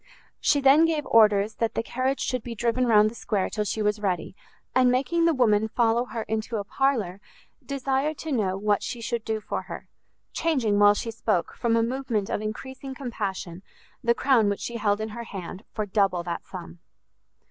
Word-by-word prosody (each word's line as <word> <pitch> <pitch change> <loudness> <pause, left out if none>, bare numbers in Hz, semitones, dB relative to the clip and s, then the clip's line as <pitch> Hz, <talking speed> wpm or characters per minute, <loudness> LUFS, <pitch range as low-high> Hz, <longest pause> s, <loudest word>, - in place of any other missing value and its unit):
She 285 - +2
then 275 +4 +6
gave 315 -3 0
orders 210 -1 +4
that 230 -1 -1
the 225 - 0
carriage 260 +3 -1
should 255 -2 -1
be 235 0 -7
driven 240 +3 +1
round 215 -2 +6
the 215 - -4
square 210 -4 -2
till 210 -1 -1
she 215 +1 -2
was 210 0 +1
ready, 185 -3 -2 0.4
and 255 -1 +4
making 280 +7 +1
the 335 - +4
woman 220 -4 +3
follow 235 +1 +2
her 230 -3 -5
into 220 +1 -3
a 205 - -2
parlour, 210 -6 0 0.4
desired 275 +2 -1
to 315 - -5
know 195 -7 0
what 205 0 +1
she 240 - -5
should 230 0 -3
do 220 -1 -2
for 210 - -4
her; - - -9 0.5
changing, 250 -11 +1
while 205 0 +6
she 230 - -3
spoke, 215 -6 -1
from 230 -1 +1
a 230 - +3
movement 235 -4 -2
of - - -1
encreasing 265 +5 -6
compassion, 195 -9 -4 0.4
the 235 0 +3
crown 240 -6 +3
which 200 - -2
she 235 - -4
held 205 -2 +1
in 220 0 -3
her 235 +2 -7
hand 190 -1 -7
for 215 - -2
double 195 -3 +1
that 170 -1 -4
sum. 175 -2 -9
225 Hz, 195 wpm, -26 LUFS, 205-255 Hz, 0.5 s, then